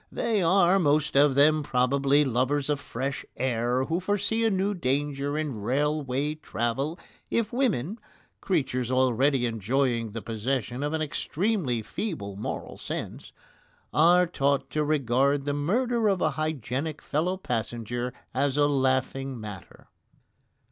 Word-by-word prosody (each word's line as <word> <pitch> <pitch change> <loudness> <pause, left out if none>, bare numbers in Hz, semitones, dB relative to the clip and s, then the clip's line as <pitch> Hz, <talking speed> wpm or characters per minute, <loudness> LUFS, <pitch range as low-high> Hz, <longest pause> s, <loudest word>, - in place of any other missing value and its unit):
They 220 -4 0
are, 185 +2 +4
most 150 -3 +2
of 140 -1 +5
them, 155 +2 +5
probably, 140 +2 +2
lovers 135 +3 0
of 145 - 0
fresh 135 +1 -4
air, 125 0 0
who 165 +4 -1
foresee 205 +4 0
a 225 - +4
new 195 0 0
danger 145 -2 -1
in 145 -9 -3
railway 145 +3 0
travel 135 +1 -2 0.3
if 230 -1 0
women 220 - 0 0.4
creatures 130 - 0
already 130 +1 +2
enjoying 115 0 0
the 115 - -4
possession 120 +3 -2
of 145 +2 -1
an 160 0 0
extremely 155 - -1
feeble 105 - -4
moral 100 - -5
sense - - -5 0.6
are 175 +3 +5
taught 140 -5 0
to 150 - 0
regard 140 -1 +1
the 145 - 0
murder 225 - +1
of 195 -3 +2
a - - +2
hygienic 155 -1 -3
fellow 175 +6 -1
passenger 120 - -3 0.2
as 140 +1 0
a 145 - +5
laughing 135 -1 0
matter. 105 -5 -10
140 Hz, 135 wpm, -27 LUFS, 125-160 Hz, 0.6 s, of